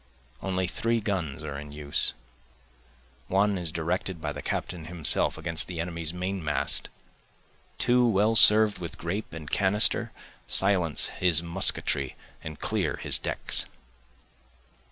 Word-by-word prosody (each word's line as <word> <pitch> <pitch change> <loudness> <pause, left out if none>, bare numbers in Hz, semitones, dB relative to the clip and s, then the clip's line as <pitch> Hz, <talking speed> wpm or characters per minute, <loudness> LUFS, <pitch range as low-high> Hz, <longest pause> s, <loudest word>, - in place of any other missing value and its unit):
Only 95 -1 -3
three 115 +6 -2
guns 90 -9 -4
are 70 -2 -7
in 75 0 -11
use, 75 -1 0 1.1
One 100 +2 0
is 85 -3 -4
directed 85 +2 -4
by 75 -2 -5
the - - -8
captain 85 -3 -5
himself 80 -2 -1
against 80 -1 -2
the 90 -2 -8
enemy's 85 -2 -4
main 90 +1 -5
mast, 75 -1 0 0.9
Two 125 0 +1
well 105 +2 +1
serv'd 110 -2 +7
with 85 -2 -8
grape 95 +6 -6
and 80 -1 -10
canister 105 +4 +3 0.4
silence 90 -6 +3
his 85 -2 +3
musketry 85 -6 0 0.3
and 80 -1 -9
clear - - -3
his - - +3
decks. - - +2
90 Hz, 130 wpm, -25 LUFS, 80-100 Hz, 1.1 s, serv'd